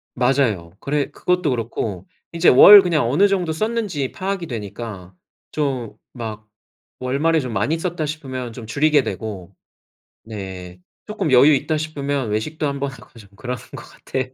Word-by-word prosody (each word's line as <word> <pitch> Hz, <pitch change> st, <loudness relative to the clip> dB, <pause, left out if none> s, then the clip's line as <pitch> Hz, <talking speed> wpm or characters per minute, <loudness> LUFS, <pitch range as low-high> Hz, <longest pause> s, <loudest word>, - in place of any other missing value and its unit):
맞아요. 125 Hz, -10 st, +1 dB
그래 145 Hz, 0 st, -1 dB
그것도 180 Hz, -2 st, 0 dB
그렇고 110 Hz, -6 st, -3 dB, 0.3 s
이제 170 Hz, +1 st, +2 dB
월 200 Hz, +10 st, +10 dB
그냥 160 Hz, -8 st, +1 dB
어느 175 Hz, +11 st, +4 dB
정도 180 Hz, -5 st, 0 dB
썼는지 205 Hz, -, -2 dB
파악이 190 Hz, -2 st, -3 dB
되니까 105 Hz, -5 st, -7 dB, 0.4 s
좀 135 Hz, -7 st, -2 dB, 0.2 s
막 110 Hz, -3 st, -7 dB, 0.5 s
월말에 145 Hz, +6 st, +1 dB
'좀 125 Hz, -5 st, -5 dB
많이 145 Hz, +12 st, 0 dB
썼다.' 170 Hz, -2 st, -3 dB
싶으면 130 Hz, -5 st, -5 dB
좀 115 Hz, 0 st, -9 dB
줄이게 145 Hz, +5 st, +3 dB
되고. 105 Hz, -6 st, -6 dB, 0.7 s
네. 95 Hz, -4 st, -8 dB, 0.3 s
조금 205 Hz, -7 st, -2 dB
여유 140 Hz, +5 st, +7 dB
있다 155 Hz, +3 st, -1 dB
싶으면 140 Hz, -5 st, -3 dB
외식도 150 Hz, +9 st, -2 dB
한번 140 Hz, -1 st, -2 dB
하고 125 Hz, -2 st, -16 dB
좀 100 Hz, -, -15 dB
그러는 120 Hz, +2 st, -5 dB, 0.2 s
것 -, -, -9 dB
같아요. 130 Hz, -1 st, -5 dB
135 Hz, 305 characters per minute, -21 LUFS, 110-155 Hz, 0.7 s, 월